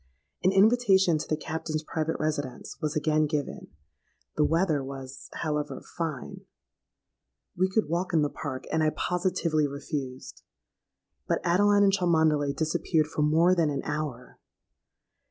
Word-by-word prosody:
An 185 - +4
invitation 195 -5 +4
to - - -5
the 155 - 0
Captain's 155 0 -4
private 160 +1 -2
residence 145 -4 -3
was 155 +1 -2
again 155 0 +2
given; 150 -1 -3 0.7
the 150 - +3
weather 160 -2 +1
was, 135 0 -8
however, 150 -2 -2 0.2
fine—we 165 +3 -7
could 215 0 +1
walk 170 +4 -1
in 160 -3 +3
the 145 - +1
Park—and 145 +2 -3
I 155 - +3
positively 170 -3 0
refused. 140 -2 -6 0.9
But - - +1
Adeline 205 +4 +4
and 195 -1 +4
Cholmondeley 160 -6 +2
disappeared 155 0 +1
for - - -1
more 160 +4 +4
than 165 -4 +2
an 140 -2 -3
hour! 145 -5 -5
155 Hz, 130 wpm, -27 LUFS, 150-175 Hz, 0.9 s, An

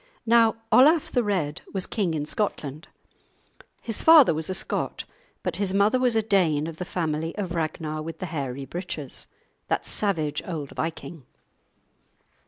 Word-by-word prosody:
Now 230 -1 +5 0.2
Olaf 305 +4 +5
the 245 - +2
Red 175 -8 -1
was 190 -2 -2
king 190 -7 -1
in 150 -1 -2
Scotland. 155 -5 -3 1.0
His 225 -2 -2
father 315 - +8
was 160 +2 -3
a 185 - -2
Scot, - - -2 0.4
but - - -2
his 195 -1 0
mother 210 +6 +3
was 250 -2 +2
a 220 - +2
Dane 175 -8 +2
of 165 -1 -6
the 180 - -4
family 160 -2 -2
of 190 -4 -3
Ragnar 155 -1 -3
with 165 +1 -6
the 185 - -5
hairy 140 -5 -4
breeches, 155 -3 -4 0.4
that - - -1
savage 165 -8 -1
old 155 -6 -5
viking. 160 -3 -5
175 Hz, 155 wpm, -25 LUFS, 155-210 Hz, 1.0 s, father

